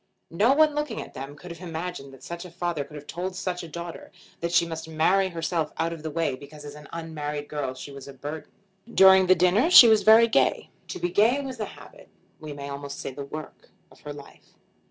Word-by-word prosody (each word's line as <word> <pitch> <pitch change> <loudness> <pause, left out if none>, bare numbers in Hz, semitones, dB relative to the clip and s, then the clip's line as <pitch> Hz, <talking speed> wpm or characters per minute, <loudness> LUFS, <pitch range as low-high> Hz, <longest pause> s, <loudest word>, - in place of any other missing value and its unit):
No 210 +10 +3
one 310 0 +4
looking 295 -6 -3
at - - -8
them 135 +2 -8
could 180 +3 -11
have 170 +1 -10
imagined 165 -4 -6
that 135 -1 -15
such 170 +1 -7
a 180 - -10
father 175 -3 -3
could 145 +2 -14
have 150 0 -9
told 180 +5 -5
such 180 -1 -3
a 170 - -8
daughter 170 +1 -8 0.3
that 170 0 -3
she 170 - +4
must 160 -1 -6
marry 170 +5 +2
herself 165 -2 -2
out 165 +1 -1
of 165 - -9
the 160 - -4
way 160 -2 -1
because 145 +2 -12
as 145 - -8
an 150 0 -12
unmarried 150 -3 -5
girl 140 -4 -4
she 130 +2 -9
was 140 -1 -10
a 140 - -9
burden. 145 +4 -7 0.4
During 190 -2 +7
the 185 - +6
dinner 185 - +3
she 265 -9 +10
was 220 -2 +5
very 225 +2 +7
gay. 225 - +1 0.2
To - - -6
be 175 +1 -2
gay 220 +9 +3
was 265 -2 -6
the 215 - -2
habit, - - -14 0.3
we 155 -1 -8
may 140 -1 -7
almost 140 0 -7
say - - -5
the 140 +1 -7
work, 155 +2 -9 0.2
of - - -19
her 150 - -8
life. 145 -1 -14
165 Hz, 235 wpm, -25 LUFS, 145-185 Hz, 0.4 s, she